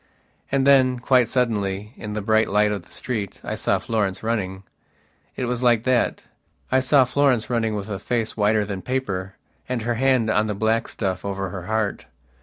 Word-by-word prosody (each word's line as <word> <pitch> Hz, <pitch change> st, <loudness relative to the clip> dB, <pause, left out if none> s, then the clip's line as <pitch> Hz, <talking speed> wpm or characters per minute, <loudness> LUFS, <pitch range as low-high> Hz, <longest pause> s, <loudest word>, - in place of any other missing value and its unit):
And 135 Hz, -1 st, +2 dB
then, 130 Hz, -2 st, +5 dB
quite 125 Hz, -1 st, +3 dB
suddenly, 105 Hz, -4 st, -1 dB
in 105 Hz, -1 st, -6 dB
the 105 Hz, -1 st, -3 dB
bright 110 Hz, +1 st, +3 dB
light 105 Hz, +1 st, +3 dB
of 100 Hz, -4 st, -3 dB
the -, -, -22 dB
street, 110 Hz, -6 st, -4 dB
I -, -, -4 dB
saw -, -, +1 dB
Florence 105 Hz, -4 st, -2 dB
running. 100 Hz, -4 st, -2 dB, 0.7 s
It 125 Hz, -, -2 dB
was 125 Hz, 0 st, -2 dB
like 120 Hz, -3 st, +3 dB
thatI 130 Hz, +1 st, -1 dB
saw 130 Hz, 0 st, +4 dB
Florence 130 Hz, -3 st, +1 dB
running 115 Hz, -2 st, 0 dB
with 100 Hz, -2 st, -4 dB
a 100 Hz, -3 st, -4 dB
face 115 Hz, +1 st, -2 dB
whiter 105 Hz, 0 st, +2 dB
than 100 Hz, -2 st, -5 dB
paper 95 Hz, -8 st, -3 dB, 0.3 s
and 125 Hz, -3 st, -2 dB
her 120 Hz, +1 st, 0 dB
hand 130 Hz, -4 st, +3 dB
on 110 Hz, 0 st, +2 dB
the 105 Hz, -, -2 dB
black 110 Hz, +2 st, +1 dB
stuff 95 Hz, -3 st, -3 dB
over 95 Hz, -1 st, -3 dB
her 90 Hz, 0 st, -7 dB
heart. 110 Hz, -2 st, -1 dB
110 Hz, 185 wpm, -23 LUFS, 100-125 Hz, 0.7 s, then